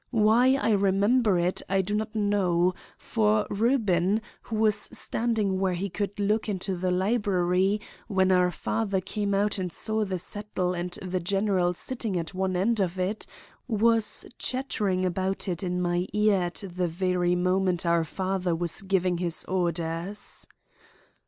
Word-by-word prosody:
Why 235 +3 +4
I 275 -4 +1
remember 200 +2 +3
it 175 +1 0
I 195 0 +2
do 205 +3 -4
not 215 +1 -2
know, 185 -4 +2 0.2
for 215 -2 +1
Reuben, 205 -4 +2 0.2
who 225 - -6
was 215 0 +3
standing 215 -2 0
where 190 -2 +1
he 190 +2 -3
could 205 +2 -3
look 210 +2 0
into 190 -1 -2
the 180 +1 -1
library 190 0 +1 0.3
when 190 -3 +2
our 180 -1 +4
father 200 +3 -1
came 200 +1 -2
out 205 0 +1
and 180 -2 -3
saw 220 +5 -1
the 190 -2 -2
settle 185 0 -3
and 175 0 -3
the 185 0 -2
general 185 -1 +1
sitting 225 -3 -3
at 165 +2 -4
one 185 0 -1
end 210 +5 +1
of 185 -1 0
it, 185 +4 -2 0.4
was 225 -1 +3
chattering 210 -8 -1
about 190 +2 -1
it 175 -2 -2
in 180 -1 -2
my 175 0 0
ear 210 -2 +3
at 175 +3 -4
the 180 0 -2
very 180 +1 0
moment 180 0 +1
our 170 -1 +3
father 185 +1 -2
was 170 +1 -1
giving 185 -2 0
his 170 -2 0
orders. 175 +1 -2
190 Hz, 155 wpm, -27 LUFS, 180-210 Hz, 0.4 s, Why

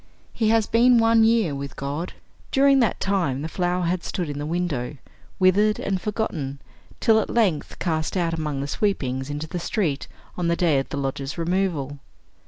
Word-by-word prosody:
He 220 -2 +1
has 225 -1 +3
been 240 +2 +5
one 225 0 +5
year 220 -8 +3
with 140 0 -6
God. 145 +5 -4 0.4
During 275 0 +5
that 230 -5 +1
time 170 -9 0
the - - -2
flower 180 +1 -1
has 175 +2 0
stood 170 -5 -3
in 145 - -5
the 145 - -3
window, 155 -6 -2 0.4
withered 205 +3 +4
and 190 -2 -2
forgotten, 160 -11 -3 0.4
till 220 -1 +4
at - - -2
length 195 -10 0
cast 160 0 -1
out 170 -2 0
among 150 -4 -2
the 140 - -3
sweepings 135 -9 -1
into 145 +1 -3
the 175 +2 -4
street, 165 -5 -1 0.3
on 175 -2 -1
the 170 - +2
day 165 -6 +2
of 135 - -4
the - - -4
lodgers' 135 0 -3
removal. 165 -5 -1
175 Hz, 185 wpm, -24 LUFS, 145-210 Hz, 0.4 s, been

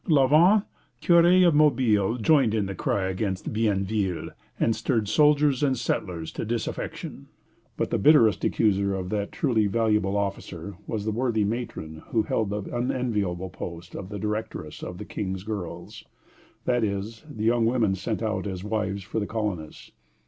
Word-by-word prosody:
" - - -26
La 135 - +5
Vente, 175 +9 +5 0.3
curé 175 +1 +5
of 170 - +4
Mobile, 125 -8 +3
joined 125 -2 +3
in 105 -2 +1
the 100 - -4
cry 95 +1 -1
against 95 +1 -3
Bienville, 100 -3 0 0.3
and 115 - +2
stirred 110 -1 0
soldiers 150 +1 +4
and 135 -3 +2
settlers 85 -7 -2
to - - -4
disaffection; 115 0 -4 0.5
but - - -1
the - - +1
bitterest 115 - +5
accuser 100 -2 +2
of 90 -1 -4
that 100 0 -2
truly 115 -7 +1
valuable 105 -2 +1
officer 100 -2 -4
was 105 -2 -3
the 110 - 0
worthy 115 -1 0
matron 100 -8 -4
who 110 -2 +1
held 105 0 -1
the 105 0 -3
unenviable 105 -8 -1
post 85 +1 -8
of 95 - -6
directress 105 -7 -4
of - - -6
the - - -7
"King's 95 -2 -4
girls," 90 -5 -6 0.6
that 120 -2 +2
is, 105 +3 -3
the 110 -7 -6
young 115 0 +3
women 115 -5 +2
sent 105 +4 -3
out 110 -1 -1
as 95 -2 -5
wives 105 -2 -2
for 100 +4 -3
the 100 - -3
colonists. 105 -9 -4
105 Hz, 165 wpm, -26 LUFS, 95-120 Hz, 0.6 s, La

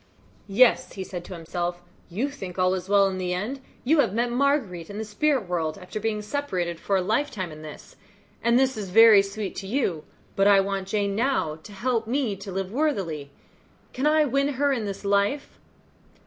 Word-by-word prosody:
"Yes," 235 +5 +4
said - - -15
he 185 -2 -5
to 185 - -7
himself, 175 +1 -4 0.3
"you 235 +11 -2
think 190 -10 -8
all 185 0 +3
is 185 0 -4
well 200 -1 +5
in 190 -1 -3
the 180 -1 -1
end; 240 +9 -4 0.2
you 300 +5 +3
have 215 -8 +2
met 240 +1 +1
Marguerite 245 - 0
in 205 - -7
the 220 - -3
spirit 240 +1 0
world, 165 -3 -2
after 180 +4 -7
being 215 -1 -2
separated 185 - -3
for 200 - 0
a 185 - 0
lifetime 215 - -1
in 155 0 -10
this, 155 -1 -11 0.4
and 235 +1 +3
this 265 0 +2
is 205 -3 -5
very 220 +1 +8
sweet 200 0 -5
to 195 - -5
you; 195 - -1 0.3
but 195 +1 +3
I 200 -1 +7
want 195 -1 -1
Jane 200 -1 -1
now 230 - 0
to 210 - -12
help 230 +2 -1
me 245 -4 0
to 195 0 -8
live 190 0 -3
worthily. 195 - -1 0.6
Can 265 +3 0
I 305 0 +4
win 275 +2 +1
her 280 +1 +1
in 230 -5 -2
this 200 0 -6
life?" 200 +8 0
205 Hz, 200 wpm, -25 LUFS, 185-255 Hz, 0.6 s, very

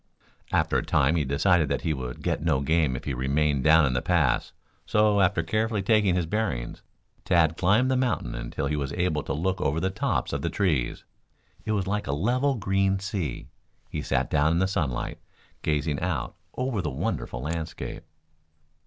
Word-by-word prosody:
After - - +2
a - - -4
time 75 +5 +2
he 80 - +1
decided 75 +3 +2
that 70 - -1
he 80 - +1
would 65 -3 -6
get - - -1
no 75 -5 +1
game 75 -2 +2
if - - -6
he 70 - -3
remained 70 +2 +1
down 80 +1 +6
in 65 - 0
the 60 - 0
pass, 80 -8 +1 0.3
so, 105 -1 +3
after 90 -3 +2
carefully 110 +3 0
taking 105 -3 +3
his 90 -2 0
bearings, 85 - -2 0.4
Tad 80 -2 +3
climbed 105 +9 +3
the - - +2
mountain 125 - 0
until - - -4
he 75 +2 0
was 70 -2 -3
able 90 -4 0
to - - -6
look 90 +5 -1
over 75 -1 +1
the 95 +2 0
tops - - -1
of - - -2
the - - -1
trees. 80 -12 0 0.6
It 110 - 0
was 100 -3 0
like 105 -1 -2
a 70 - 0
level 125 - +1
green 95 -2 +1
sea. 95 - -4 0.4
He - - -3
sat - - -1
down 75 +3 +3
in - - +1
the 95 +2 +2
sunlight, 75 -10 -2 0.4
gazing 75 -1 0
out - - -2 0.2
over 125 -5 -1
the 75 - -2
wonderful 65 -2 -3
landscape. 80 +1 -4
80 Hz, 190 wpm, -26 LUFS, 70-95 Hz, 0.6 s, down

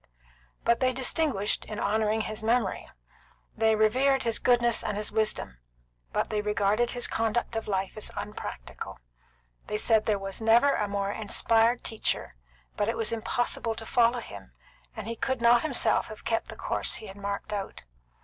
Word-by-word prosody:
But 235 - +3
they 255 -1 +2
distinguished, 255 -5 0
in 215 - -6
honouring 215 +1 +1
his 215 0 -4
memory. 235 +3 0 0.7
They 220 0 +3
revered 260 +5 +3
his 230 -2 0
goodness 240 -2 +3
and 210 -2 -2
his 210 - -2
wisdom, 215 - -1 0.5
but - - -1
they 210 -1 0
regarded 210 +2 +1
his 245 -1 0
conduct 225 +1 -1
of 225 - -3
life 195 -2 -1
as 215 - -5
unpractical. 205 - -6 0.7
They 210 - -1
said 220 0 +3
there 215 - +3 0.3
never 230 +5 +5
was - - -1
a - - -5
more 200 0 -1
inspired 225 +2 +2
teacher, 220 - -1 0.4
but 205 - 0
it 230 - -1
was 225 - 0
impossible 230 0 -1
to 225 - -7
follow 235 +1 +3
him, - - -11 0.4
and 220 -3 -6
he 230 - -3
could 260 +3 -1
not 235 0 +5
himself 300 -5 +2
have 215 - -11
kept 225 0 0
the - - -9
course - - -1
he 220 - -7
had 195 -2 -9
marked 200 +1 -4
out. 200 -2 -5
220 Hz, 170 wpm, -28 LUFS, 210-235 Hz, 0.7 s, never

